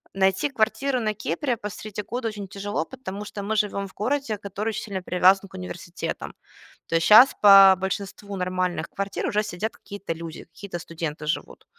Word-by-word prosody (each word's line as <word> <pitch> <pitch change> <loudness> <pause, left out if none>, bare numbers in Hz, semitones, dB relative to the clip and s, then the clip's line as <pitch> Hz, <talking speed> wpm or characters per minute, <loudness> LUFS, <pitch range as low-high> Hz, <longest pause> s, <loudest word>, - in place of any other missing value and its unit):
Найти 190 +8 +2
квартиру 255 +3 +1
на 215 -2 -1
Кипре 220 - -2
посреди 210 -1 -6
года 240 +3 -3
очень 210 -3 -5
тяжело, 200 -3 -3
потому 210 -6 -7
что 210 - -7
мы 210 +2 -2
живем 200 -1 0
в - - -19
городе, 245 0 -1
который 200 +2 -4
очень 220 - -4
сильно 195 -3 -4
привязан 190 +2 +3
к - - -13
университетам. 180 -1 -6 0.5
То - - -6
есть 165 0 +2
щас 230 +5 +8
по 195 -2 +9
большинству 200 +1 -4
нормальных 185 -1 -2
квартир 200 0 -3
уже 210 - +1
сидят 210 +2 -4
какие-то 200 -4 -6
люди, 165 0 -8
какие-то 200 -3 -8
студенты 160 -3 -5
живут. 155 - -4
200 Hz, 175 wpm, -25 LUFS, 185-215 Hz, 0.5 s, по